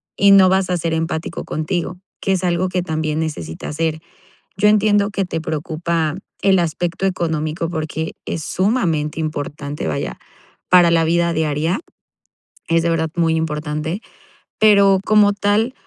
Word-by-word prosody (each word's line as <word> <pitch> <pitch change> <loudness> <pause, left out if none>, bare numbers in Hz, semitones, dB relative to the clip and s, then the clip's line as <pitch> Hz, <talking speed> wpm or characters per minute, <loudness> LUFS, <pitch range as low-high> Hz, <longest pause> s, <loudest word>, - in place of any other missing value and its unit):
y 200 - +4
no 195 -1 +7
vas 190 0 +1
a 180 - +1
ser 165 -1 -2
empático 160 0 -3
contigo, 175 +3 -3 0.2
que 195 - +1
es 185 -1 -1
algo 180 +1 +1
que 180 -1 -1
también 155 -2 -2
necesitas 150 - -5
ser. 160 -1 -1 0.6
Yo 210 - +3
entiendo 205 -1 +3
que 195 - -1
te 175 -3 -3
preocupa 160 0 -2 0.3
el 195 -1 +4
aspecto 170 +2 -1
económico, 165 -2 -1
porque 160 -1 -4
es 160 - -4
sumamente 170 -8 0
importante, 145 - -4
vaya, 75 - -3 0.5
para 175 -2 +6
la 165 -1 +3
vida 170 +1 +2
diaria 160 +1 0 0.9
es 165 0 +3
de 170 - 0
verdad 160 -1 0
muy 165 -2 +2
importante, 155 +3 -3 0.6
pero, 200 -3 +5
como 210 -1 +5
tal, 205 +4 +1
165 Hz, 150 wpm, -19 LUFS, 155-190 Hz, 0.9 s, no